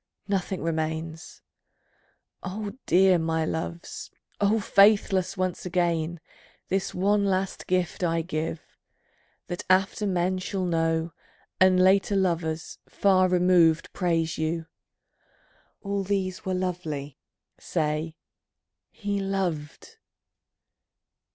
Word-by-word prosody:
Nothing 190 -3 -2
remains. 160 0 -4 1.0
O 205 +2 -5
dear 185 0 +5
my 160 0 0
loves, 170 +2 -5 0.3
O 210 +2 +3
faithless, 200 -2 +3
once 185 -1 -2
again 170 -2 0 0.5
This 190 0 0
one 200 +2 +2
last 190 0 -1
gift 180 -1 0
I 165 -1 +1
give: 160 -1 -3 0.8
that 175 - -5
after 195 +3 +2
men 185 0 0
Shall 185 0 -3
know, 165 -1 0 0.5
and 185 0 +5
later 195 +2 +4
lovers, 165 -4 -1
far 185 -2 +3
removed, 180 -3 +3
Praise 165 -4 0
you, 160 +1 -1 1.2
"All 200 -1 -1
these 190 -1 -2
were 190 -1 -1
lovely"; 160 -7 -4 0.4
say, 155 0 -2 0.7
"He 205 -1 -3
loved." 195 - -3
180 Hz, 100 wpm, -26 LUFS, 165-195 Hz, 1.2 s, dear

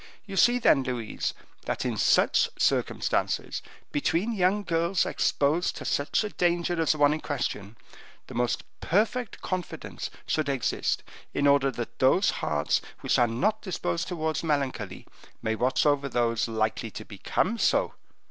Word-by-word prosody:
You 195 -2 -7
see, 240 +7 +5
then, 150 - +4
Louise, 125 -4 -3 0.3
that, - - -2
in - - -1
such - - +3
circumstances, - - 0 0.3
between 170 +9 0
young 200 +1 +2
girls 170 +1 +1
exposed 155 +5 +1
to - - -7
such 140 +9 +1
a 210 - -3
danger 175 -2 0
as 160 - +3
the - - -7
one 145 0 +5
in 155 - -4
question, 115 -6 -3 0.5
the - - -11
most 120 0 0 0.2
perfect 220 +5 0
confidence 185 -1 -4 0.2
should 155 -3 0
exist, 135 -4 0 0.3
in 145 - +1
order 140 -1 +5
that 120 -3 -6
those 170 +10 +4
hearts 75 -1 +1 0.2
which - - +2
are 120 - +5
not 205 - 0
disposed 85 - -2
towards 160 -2 -2
melancholy 135 - -2 0.4
may 110 - 0
watch 125 +6 +1
over 145 -1 +2
those 115 -2 +1
likely 110 0 -1
to 110 0 -8
become 120 - -1
so." - - +2
145 Hz, 150 wpm, -27 LUFS, 120-180 Hz, 0.5 s, see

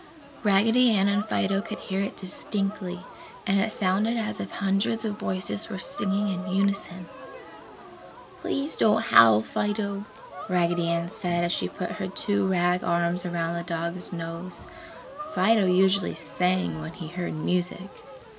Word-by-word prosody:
Raggedy 225 +5 +4
Ann 195 0 +3
and 200 0 +2
Fido 195 -2 +1
could 220 - -6
hear 190 0 -3
it 200 - -4
distinctly 195 -1 -3 0.4
and 195 +1 +2
it 215 +3 +1
sounded 210 +5 +1
as 220 -2 -3
if 100 0 -4
hundreds 200 - 0
of 210 -1 -3
voices 185 +3 -3
were 195 - -5
singing 205 -3 0
in 190 0 -3
unison. 195 -2 -1 1.3
"Please 280 +2 -2
don't 220 +1 +3
howl, 110 - +7
Fido," 205 - -2 0.4
Raggedy 175 -1 +1
Ann 170 +1 -1
said 175 -2 0
as 170 0 +1
she - - 0
put 180 - -5
her 190 - -1
two 200 +1 0
rag 180 -1 +2
arms 170 +1 +1
around 170 -1 -2
the 170 0 -3
dog's 170 +1 -3
nose. 170 +1 -6 0.7
Fido 200 +1 +4
usually 190 +1 +3
"sang" 180 - -1
when 75 - -7
he 165 -4 -8
heard 175 -1 -4
music. 180 +3 -1
190 Hz, 145 wpm, -26 LUFS, 175-200 Hz, 1.3 s, howl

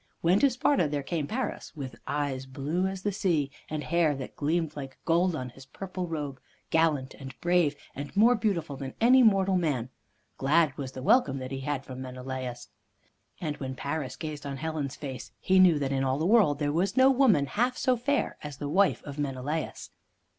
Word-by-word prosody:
When 180 +4 +4
to 280 - +5
Sparta 250 - +2
there 145 -1 -2
came 155 -1 -2
Paris, 235 - -4
with 135 -4 -6
eyes 140 -3 -2
blue 150 +8 -1
as 190 -1 -5
the 205 - +1
sea, 165 -8 0 0.2
and 155 -1 -3
hair 160 +1 +2
that 135 -1 -7
gleamed 160 +1 -1
like 135 -2 -7
gold 170 +1 +2
on 130 -3 -4
his 130 +2 -15
purple 185 +1 -5
robe, 145 -5 -4 0.3
gallant 155 -5 +2
and 130 -1 -10
brave, 175 -4 +2 0.2
and 145 +7 -7
more 230 +4 +7
beautiful 195 - -1
than 135 -1 -7
any 255 +3 +6
mortal 195 -4 +4
man, 140 -9 -1 0.5
glad 145 +1 +3
was 135 -2 -6
the 130 - -7
welcome 140 - +4
that 130 0 -6
he 135 - -3
had 135 0 -3
from 130 0 -7
Menelaus. 130 -1 -6 0.7
And 150 -4 -3
when 130 -1 -5
Paris 140 -1 -3
gazed 155 -2 -6
on 140 -1 -5
Helen's 155 -3 -3
face, 135 -3 -7
he 190 0 +3
knew 180 -4 +6
that 140 -2 -1
in 135 -1 0
all 130 0 +1
the 160 - -1
world 195 -8 +4
there 145 0 -1
was 185 +6 0
no 260 +1 +7
woman 240 - +4
half 245 - 0
so 255 -2 +2
fair 275 +4 -1
as 145 -3 -7
the 145 - -4
wife 190 +4 +2
of 145 0 -8
Menelaus. 145 +3 -3
150 Hz, 195 wpm, -28 LUFS, 135-185 Hz, 0.7 s, more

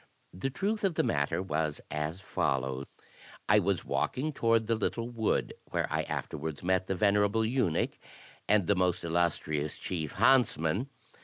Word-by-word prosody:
The 95 +9 -2
truth 205 +9 -2
of 190 -4 +1
the - - +2
matter 75 +5 0
was 75 -3 -1
as 75 +4 -3
follows: 65 -5 -1 0.6
I 105 +1 +6
was 100 -1 0
walking 150 +4 -1
toward 115 -3 +2
the 115 - +1
little 115 +1 -1
wood, 110 -2 0
where - - -1
I - - +2
afterwards 75 +1 -4
met 95 +1 +1
the 95 - 0
ven 100 +2 +3
erable 105 +2 +2
eunuch, 115 -9 0 0.5
and 105 -3 +4
the 100 - +3
most 90 -2 +1
illustrious 80 -3 0
chief 80 -5 -4
himtsmah. 115 - +3
95 Hz, 155 wpm, -30 LUFS, 80-115 Hz, 0.6 s, I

